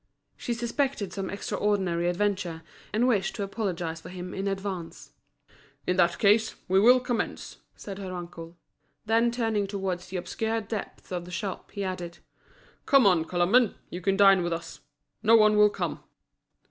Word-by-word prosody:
She 240 - -3
suspected 235 -4 -2
some 195 -2 -4
extraordinary 190 -4 0
adventure, 180 -3 -1 0.3
and 225 +4 +2
wished 205 -7 +1
to 205 - -3
apologise 180 -6 -3
for 170 - -10
him 180 0 -7
in 195 +1 -3
advance. 195 -3 -5 0.7
"In 180 - +1
that 175 -1 +3
case, 215 +2 +3
we 190 +1 +4
will 245 +5 +7
commence," 245 -1 -3 0.2
said 200 -1 -8
her 190 -2 -6
uncle. 170 -1 -8 0.5
Then 225 +2 +3
turning 225 -4 0
towards 190 -3 -3
the 185 0 -4
obscure 220 +6 -2
depths 210 -2 -7
of 175 -1 -3
the - - -11
shop, 180 +2 -5
he 200 - -5
added: 180 -2 -5 0.7
"Come 275 -4 +6
on, 175 -5 +4
Colomban, 190 +8 +3 0.2
you 180 - -5
can 195 +2 +1
dine 195 -2 +6
with 175 -1 -1
us. 165 0 -6 0.4
No 225 +1 +6
one 215 -1 +6
will 210 0 +6
come." - - -4
195 Hz, 160 wpm, -27 LUFS, 180-215 Hz, 0.7 s, will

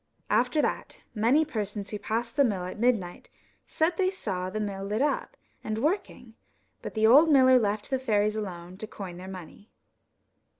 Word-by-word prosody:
After 305 - +2
that, - - -3
many 245 +8 +3
persons 210 -6 -4
who 210 - -4
passed 230 +3 -3
the 285 - +5
mill 200 -8 0
at 185 - -7
midnight 220 -7 0 0.4
said 325 +1 0
they 370 -1 +2
saw 190 - -3
the 215 +3 -4
mill 200 -2 -4
lit 210 +2 -2
up - - -2 0.3
and 215 0 -3
working; 285 - -2 0.5
but - - -7
the 220 0 +2
old 285 +8 +7
miller 260 -2 +6
left 210 0 -2
the 265 - +1
fairies 215 -4 +1
alone 180 -4 -6
to 215 - -7
coin 190 -5 -8
their 185 +1 -9
money. 190 +2 -10
215 Hz, 175 wpm, -27 LUFS, 200-260 Hz, 0.5 s, old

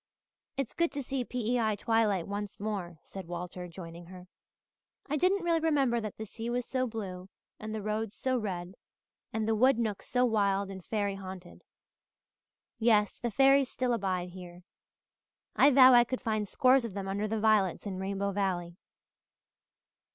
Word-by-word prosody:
"It's 275 -4 -2
good 340 0 +1
to 285 -1 -3
see 265 0 -2
P.E.I. 235 -2 0
twilight 210 -4 +1
once 205 0 -5
more," 195 -5 -4
said 190 -3 -9
Walter, 180 +1 -6
joining 170 0 -10
her. 180 0 -11 0.8
"I 300 - -1
didn't 370 +4 +2
really 335 -1 +2
remember 275 -7 +2
that 215 -2 -6
the 220 - -5
sea 225 +3 -6
was 245 0 -1
so 255 -1 -1
blue 195 -5 -6 0.3
and 215 0 -6
the 215 - -4
roads 215 0 -2
so 260 -1 -1
red 185 -6 -3 0.6
and 220 -1 -2
the 225 - +2
wood 255 +4 +4
nooks 220 -4 -2
so 250 0 +3
wild 200 -3 +1
and 190 -2 -8
fairy 205 -1 -1
haunted. 185 -2 -10 1.2
Yes, 215 -3 +3
the 240 - -2
fairies 270 +3 +4
still 250 -1 -1
abide 185 -5 -1
here. 180 -1 -11 0.9
I 280 - +6
vow 260 -2 +8
I 240 0 +8
could 255 +1 -4
find 215 -2 -1
scores 255 +4 +4
of 225 -5 -6
them 195 -1 -4
under 200 +2 -1
the 220 +1 -1
violets 210 -4 +2
in 190 -2 -4
Rainbow 200 +1 -2
Valley." 180 -3 -2
215 Hz, 165 wpm, -30 LUFS, 190-245 Hz, 1.2 s, vow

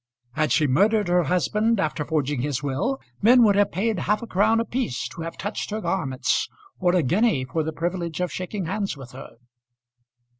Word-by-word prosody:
Had 155 +4 0
she 155 - +3
murdered 205 +9 +3
her 175 -1 +3
husband 210 - +1
after 155 -2 -1
forging 145 -3 -1
his 140 0 -2
will, 145 - -1 0.2
men 240 +3 +6
would 205 -3 +5
have 205 0 +3
paid 210 +2 -1
half 210 +6 0
a - - -4
crown 220 +2 +2
apiece 230 - -2
to 170 - -9
have 165 0 -6
touched 205 +2 -4
her 215 +1 -3
garments, 140 -11 -1 0.3
or 180 -1 +2
a 175 - +3
guinea 180 - +2
for 145 +5 -2
the 160 +1 -2
privilege 170 +1 -3
of 180 -1 -1
shaking 185 +1 -4
hands 195 -1 -2
with 130 -3 -11
her. 130 -2 -11
180 Hz, 190 wpm, -24 LUFS, 150-210 Hz, 0.3 s, men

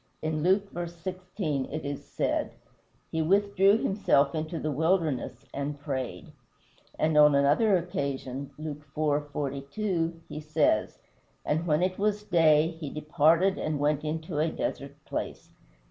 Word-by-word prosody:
In 155 -1 -1
Luke 195 +4 +2
v. 175 0 -4
16, 175 -4 -4
it 155 +1 -5
is 140 0 -4
said: - - -1 0.6
"He 160 - 0
withdrew 200 +3 +4
himself 150 -10 +2
into 155 +1 -3
the 155 -1 -2
wilderness 160 -3 0
and 140 +1 -3
prayed;" 135 -4 -4 0.7
and 155 0 +1
on 150 -1 +7
another 150 +9 +4
occasion 140 -5 -4
(Luke 150 -1 -6 0.2
iv. 150 -1 +1
42), 165 +5 -2
he - - -6
says: 150 -8 +1 0.5
"And 160 +3 0
when 155 +2 +2
it 185 +1 -1
was 210 0 0
day, 160 -5 +4
he 150 -4 -5
departed 160 +5 +2
and 155 -1 -1
went 150 0 +1
into 160 0 -3
a 160 +2 +2
desert 140 -2 -4
place." - - -5
155 Hz, 140 wpm, -28 LUFS, 145-175 Hz, 0.7 s, on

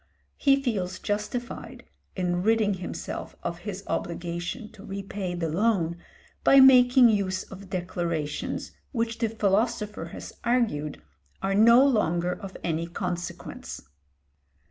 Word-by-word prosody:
He 275 -1 +4
feels 200 -9 -2
justified 210 +4 -4 0.3
in 180 -1 0
ridding 215 0 +3
himself 185 -2 -6
of 170 0 -3
his 200 -1 -6
obligation 170 +6 -4
to 195 - -14
repay 195 -2 -4
the 170 -2 -1
loan 175 -1 +1 0.5
by 275 - +7
making 250 -1 +8
use 190 -3 0
of 195 0 -11
declarations 170 -5 -3 0.2
which 230 -3 -2
the 225 -2 +1
philosopher 210 -2 0
has 170 - -9
argued 225 - 0 0.4
are 195 0 +1
no 235 +6 +7
longer 180 -9 +2
of 190 0 -8
any 165 0 -1
consequence. 175 0 -5
195 Hz, 120 wpm, -27 LUFS, 175-230 Hz, 0.5 s, making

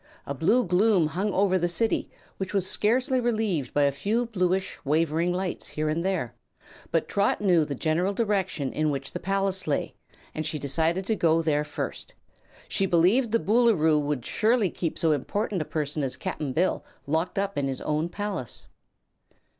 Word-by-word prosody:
A 140 - -3
blue 215 - +2
gloom 185 0 +3
hung 190 +7 -1
over 190 -1 +2
the 175 - +1
City, 220 +6 0 0.3
which 190 +1 -4
was 190 -2 +1
scarcely 250 +6 +1
relieved 215 - 0
by 145 - +2
a 140 - +3
few 215 - -1
bluish, 190 -4 -1
wavering 160 +3 +1
lights 180 0 -3
here 155 0 -2
and 165 +2 -1
there, 180 -11 -1 0.6
but 165 - 0
Trot 200 0 +1
knew 180 -6 +3
the 145 - -4
general 165 +7 0
direction 195 - -1
in 155 0 +1
which 140 -1 -3
the - - -5
palace 195 -1 -1
lay 145 - -1 0.4
and 155 - -3
she 155 0 -2
decided 160 +6 0
to 220 - +1
go 165 -3 +2
there 150 -2 +1
first. - - -6 0.5
She 195 - +1
believed 190 +9 +3
the 230 - +4
Boolooroo 205 -10 +3
would 145 -4 -2
surely 220 -3 +2
keep 165 -3 -3
so 165 - +2
important 190 - -1
a - - -3
prisoner 150 -2 -2
as 125 - -6
Cap'n 155 -7 -4
Bill 175 +7 0 0.2
locked 160 +6 -1
up 200 0 -1
in 140 -1 0
his 135 -1 -3
own 155 +2 -1
palace. 195 - -5
180 Hz, 180 wpm, -26 LUFS, 155-200 Hz, 0.6 s, the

